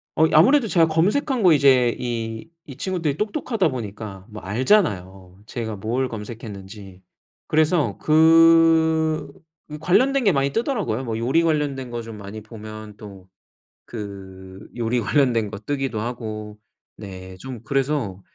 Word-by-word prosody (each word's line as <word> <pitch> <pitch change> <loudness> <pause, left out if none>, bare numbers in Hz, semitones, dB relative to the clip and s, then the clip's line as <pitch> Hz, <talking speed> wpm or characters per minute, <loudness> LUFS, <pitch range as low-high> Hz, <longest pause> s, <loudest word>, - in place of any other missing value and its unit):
어 160 - +4
이 - - -2
아무래도 230 - +5
제가 165 -4 +3
검색한 215 - +1
거 180 -3 +6
이제 130 -5 +4
이 115 -1 -4 0.2
이 135 - -11
친구들이 165 -3 -2
똑똑하다 215 - -1
보니까 105 -5 -7
뭐 105 0 -9
알잖아요 95 - 0
제가 115 -3 -5
뭘 120 +6 -2
검색했는지. 105 -4 -9 0.5
그래서 155 - +2
그 160 0 +4 0.4
그 150 0 -7
관련된 245 - +2
게 200 - +4
많이 140 -2 +1
뜨더라고요. 210 - -1
뭐 115 -3 -3
요리 130 +8 +2
관련된 145 -5 -1
거 120 -1 -4
좀 115 -2 -9
많이 100 +2 -8
보면 110 -1 -10
또 100 -3 -12 0.6
그 95 -3 -9
요리 120 +1 0
관련된 115 -3 +1
거 100 - -6
뜨기도 135 0 -3
하고 110 -2 -6 0.4
네 95 -2 -9
좀 130 +2 -8
그래서 135 -9 -1
125 Hz, 280 characters per minute, -22 LUFS, 105-160 Hz, 0.6 s, 거